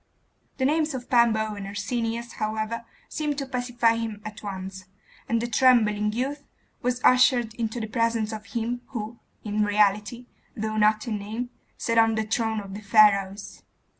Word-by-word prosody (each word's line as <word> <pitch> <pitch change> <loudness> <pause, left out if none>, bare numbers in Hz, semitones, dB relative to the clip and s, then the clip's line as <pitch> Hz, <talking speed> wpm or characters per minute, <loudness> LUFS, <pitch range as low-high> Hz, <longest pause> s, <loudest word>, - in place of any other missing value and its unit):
The 260 - 0
names 305 0 +1
of 245 -1 -7
Pambo 220 -3 +3
and 200 -1 -6
Arsenius, 230 +3 -3
however, 220 +2 -2 0.2
seemed 300 -2 -2
to 275 - -2
pacify 245 -3 +1
him 225 -2 -4
at 215 0 -7
once; 190 -2 -6 0.4
and 230 - +2
the 235 - -2
trembling 220 -4 +3
youth 270 +6 -3 0.4
was 250 0 -1
ushered 250 -3 +4
into 230 0 -3
the 220 - -2
presence 230 -1 0
of 215 -1 -7
him 235 +2 -3
who 230 -1 -6 0.2
in 210 0 0
reality, 210 +3 +1 0.3
though 215 0 -2
not 215 +1 +3
in 215 -3 -2
name, 225 +5 -5 0.3
sat 230 -1 +1
on 225 0 +4
the 220 - 0
throne 220 0 -1
of 195 -1 -9
the 205 - -7
Pharaohs. 205 -2 +3
225 Hz, 165 wpm, -25 LUFS, 210-240 Hz, 0.4 s, ushered